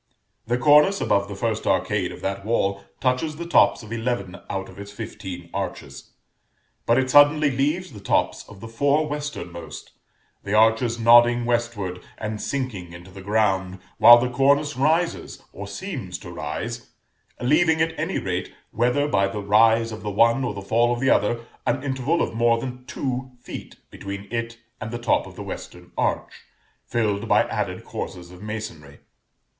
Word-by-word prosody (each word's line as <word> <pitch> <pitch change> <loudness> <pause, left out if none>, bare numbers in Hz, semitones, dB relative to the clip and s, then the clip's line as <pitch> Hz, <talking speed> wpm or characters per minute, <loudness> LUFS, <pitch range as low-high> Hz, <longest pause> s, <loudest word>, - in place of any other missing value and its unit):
The 120 +1 +1
cornice 150 +8 +5
above 100 0 +1
the 100 - -7
first 110 +1 -2
arcade - - +1
of - - -10
that 100 0 -3
wall 100 -3 0 0.2
touches 130 +5 0
the 170 +2 -6
tops 170 -7 +4
of 110 - -12
eleven 115 -6 -2
out 95 0 -3
of 95 +1 -13
its 100 0 -8
fifteen 90 -3 -7
arches; 70 0 -6 0.7
but 115 - +4
it 130 0 +1
suddenly 145 +1 +6
leaves 150 +7 -1
the 105 - -9
tops 100 - 0
of 100 -1 -13
the 115 - -7
four 140 +6 +1
westernmost; 145 - -6 0.5
the 100 +1 -1
arches 115 +2 +3
nodding 120 +1 +6
westward 115 -7 -2 0.2
and 110 -1 -4
sinking 110 -11 -4
into 85 +2 -12
the 95 +1 -10
ground, 95 -2 0 0.2
while 120 0 +10
the 120 +1 +1
cornice 140 +3 +2
rises 160 +6 0
(or - - -7
seems - - -6
to - - -10
rise), - - -5 0.5
leaving 160 +6 +3
at 160 0 +1
any 165 +5 -1
rate, 90 -1 -3 0.2
whether 125 +5 +1
by 100 -9 +2
the 100 +2 -5
rise 115 +3 +4
of 110 - -7
the 105 - -4
one 115 +5 +3
or 120 -5 -2
the 100 - -6
fall 115 +4 +2
of 120 - -1
the 135 +1 +2
other, 115 +3 +1 0.2
an - - 0
interval 135 +4 0
of - - -3
more 115 0 +3
than 125 0 -7
two 130 -1 -4
feet 125 - -9 0.2
between 100 0 -7
it 115 0 -3 0.2
and 110 - -4
the 120 - -4
top 120 -1 +1
of - - -13
the - - -7
western - - -9
arch, - - -2 0.5
filled 110 -2 -1
by - - +4
added - - -4
courses 90 -1 -7
of 90 0 -13
masonry. 105 -10 -7
115 Hz, 170 wpm, -23 LUFS, 100-130 Hz, 0.7 s, while